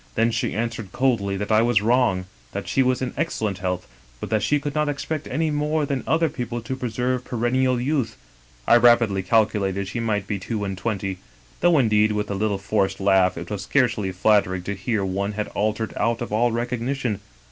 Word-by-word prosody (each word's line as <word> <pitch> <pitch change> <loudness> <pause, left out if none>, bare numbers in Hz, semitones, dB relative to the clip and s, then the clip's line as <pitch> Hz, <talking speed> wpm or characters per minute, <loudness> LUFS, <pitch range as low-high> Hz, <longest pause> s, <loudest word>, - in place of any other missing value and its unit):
Then 115 +1 +2
she 115 - -1
answered 115 -3 -3
coldly 105 -7 +1
that 105 +2 -3
I 110 0 +5
was 115 -3 +3
wrong, 115 -6 +2 0.3
that - - -4
she 135 - +2
was 130 0 +1
in 125 - -3
excellent 110 - -2
health, 90 -1 -3 0.3
but - - -6
that 110 -1 +2
she 145 +9 +2
could 145 0 -4
not 150 0 +1
expect 150 +2 -3
any 155 +4 0
more 150 +1 0
than 140 -2 -2
other 165 +1 +3
people 120 -5 -4
to 120 +3 -4
preserve 125 0 -2
perennial 125 +1 +1
youth 135 -2 -1 0.5
(I 120 - +7
rapidly 120 -4 +4
calculated 100 -1 +1
she 110 +5 -4
might 105 -3 -1
be 100 0 -3
two 105 +2 -3
and 95 -1 -3
twenty), 95 -2 -3 0.4
though, 175 -2 +4
indeed, 110 -4 +3
with 105 -1 -2
a - - 0
little 100 0 0
forced 95 -1 0
laugh, 95 -1 +3
it 85 +3 -7
was 100 -2 -3
scarcely 105 -3 +1
flattering 95 -1 +2
to 100 - -3
hear 100 +1 -1
one 100 +2 -2
had 105 0 -3
altered 110 +1 -1
out 115 0 0
of 120 -3 -5
all 120 +2 +3
recognition. 120 -1 -2
110 Hz, 200 wpm, -23 LUFS, 100-125 Hz, 0.5 s, I